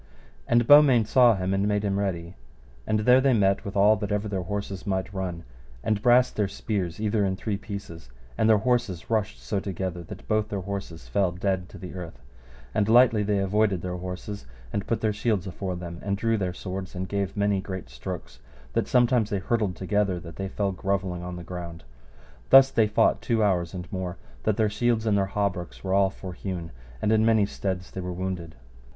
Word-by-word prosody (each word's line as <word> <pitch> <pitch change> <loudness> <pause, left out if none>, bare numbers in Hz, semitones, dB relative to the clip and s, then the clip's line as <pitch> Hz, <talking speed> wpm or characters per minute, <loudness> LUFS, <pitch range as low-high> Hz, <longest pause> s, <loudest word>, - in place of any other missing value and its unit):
And 120 0 +3
Beaumains 135 -6 +7
saw 120 -3 +6
him 95 0 -1
and 100 +1 +1
made 105 0 +1
him 100 -1 0
ready, 85 -4 -3 0.5
and 110 0 +1
there 125 +4 +6
they 135 -1 +4
met 100 -2 +2
with 100 - -6
all 105 +2 +6
that 105 0 -4
ever 105 +1 0
their 95 -2 -2
horses 100 +1 -5
might 95 +1 -2
run, 90 -3 -4 0.4
and 105 -2 0
brast 125 +2 +4
their 105 -2 +1
spears 95 -4 -3
either 105 -1 +1
in 95 -1 0
three 105 +2 -3
pieces, 100 - -8 0.3
and 110 - +2
their 110 - +6
horses 115 -5 -1
rushed 110 -1 0
so 100 - -2
together 95 -2 -4
that - - -10
both 110 0 +1
their 100 -3 -3
horses 95 -3 -6
fell 95 -3 +1
dead 90 0 -2
to - - -11
the 90 - -8
earth; 85 -9 -8 0.5
and 105 0 +1
lightly 120 -2 +6
they 105 0 +1
avoided 100 -1 +1
their 90 0 -3
horses 90 0 -6 0.3
and 100 - -2
put 115 -2 -1
their 110 -1 +1
shields 105 -3 0
afore 95 0 -4
them, 85 -1 -7
and 100 0 -1
drew 115 +2 +1
their 95 -4 -1
swords, 95 +1 -6
and 95 +1 -3
gave 100 0 -2
many 100 -1 +1
great 95 -1 -6
strokes - - -7 0.3
that - - 0
sometime 120 -2 +3
they 100 -1 -2
hurtled 100 -1 0
together 95 0 0
that 85 -1 -10
they 95 - -3
fell 100 0 -1
grovelling 95 -1 -2
on 90 0 -6
the 90 - -7
ground. 85 -1 -7 0.7
Thus 135 0 +8
they 115 -4 +3
fought 105 - +2
two 115 -2 +1
hours 90 -3 +1
and 90 -1 -5
more, 95 -1 -4 0.3
that 110 - +1
their 110 -2 +3
shields 110 +2 0
and 105 -2 +3
their 100 -1 +2
hauberks 100 -4 -2
were 95 0 -1
all 100 0 +4
forhewen, 90 -2 -6 0.3
and 105 - +2
in 110 0 +4
many 110 -2 +4
steads 95 -2 -4
they 95 - -5
were 90 0 -4
wounded. 90 -2 -4
100 Hz, 205 wpm, -26 LUFS, 90-110 Hz, 0.7 s, Thus